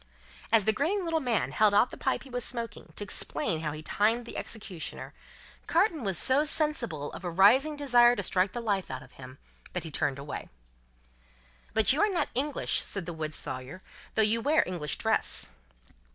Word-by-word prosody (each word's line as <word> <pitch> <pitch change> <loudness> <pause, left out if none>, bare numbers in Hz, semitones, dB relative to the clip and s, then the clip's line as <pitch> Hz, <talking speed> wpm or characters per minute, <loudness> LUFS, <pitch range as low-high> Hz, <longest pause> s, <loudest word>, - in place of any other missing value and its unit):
As 225 -3 +4
the 220 - +4
grinning 350 - 0
little 330 -1 0
man 245 -6 0
held 210 -2 +3
out 235 - +4
the - - -7
pipe - - -1
he 270 - -14
was 245 0 -2
smoking, 230 -3 -4
to - - -5
explain 185 -4 0
how 155 -1 -3
he 155 +1 -8
timed 225 +7 +1
the - - -9
executioner, 195 -7 -5 0.5
Carton 330 - +2
was 195 -4 +1
so 265 - +4
sensible 280 - 0
of - - -9
a 175 - -2
rising 245 - +4
desire 245 -4 +5
to - - -3
strike 185 0 +1
the 240 - -4
life 200 -5 -1
out 130 0 -6
of 130 - -17
him, 130 0 -12 0.4
that 180 - -3
he 160 - -7
turned 145 -2 0
away. 140 +1 -7 1.3
"But 220 +2 +4
you 290 - 0
are 420 - +4
not 370 - -1
English," 280 +4 0
said 195 -4 -4
the 170 - -5
wood 155 -1 -4
sawyer, 130 +9 -6 0.3
"though 220 - +4
you 225 +2 +2
wear 300 +6 +3
English 165 -6 -3
dress?" - - 0
215 Hz, 195 wpm, -29 LUFS, 170-260 Hz, 1.3 s, desire